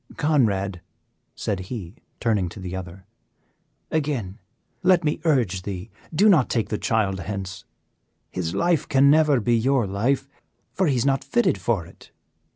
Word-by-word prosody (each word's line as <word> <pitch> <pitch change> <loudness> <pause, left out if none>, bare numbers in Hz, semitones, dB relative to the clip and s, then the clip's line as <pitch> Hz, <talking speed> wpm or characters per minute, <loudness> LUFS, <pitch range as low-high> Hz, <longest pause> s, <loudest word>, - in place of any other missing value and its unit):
"Conrad," 100 - +1 0.5
said 100 - -2
he, 100 -8 -6 0.3
turning 105 -6 +1
to 100 - -11
the 90 -1 -5
other, 95 0 -8 0.9
"again 135 -10 -2 0.4
let 180 -1 +4
me 150 +1 -1
urge 120 - +2
thee; 95 +2 -6 0.2
do 185 +7 +4
not 165 - +5
take 110 -4 0
the 105 - -2
child 100 -4 0
hence, 95 +2 -6 0.7
his 85 -2 -3
life 170 -2 +1
can 140 -1 +5
never 150 -3 +4
be 120 +1 +2
your 125 +1 +2
life, 120 +8 0 0.5
for 190 -2 +1
he 140 - +2
is 120 +1 +1
not 135 0 +1
fitted 120 -4 +1
for 95 -3 0
it. - - -17
115 Hz, 155 wpm, -24 LUFS, 95-140 Hz, 0.9 s, not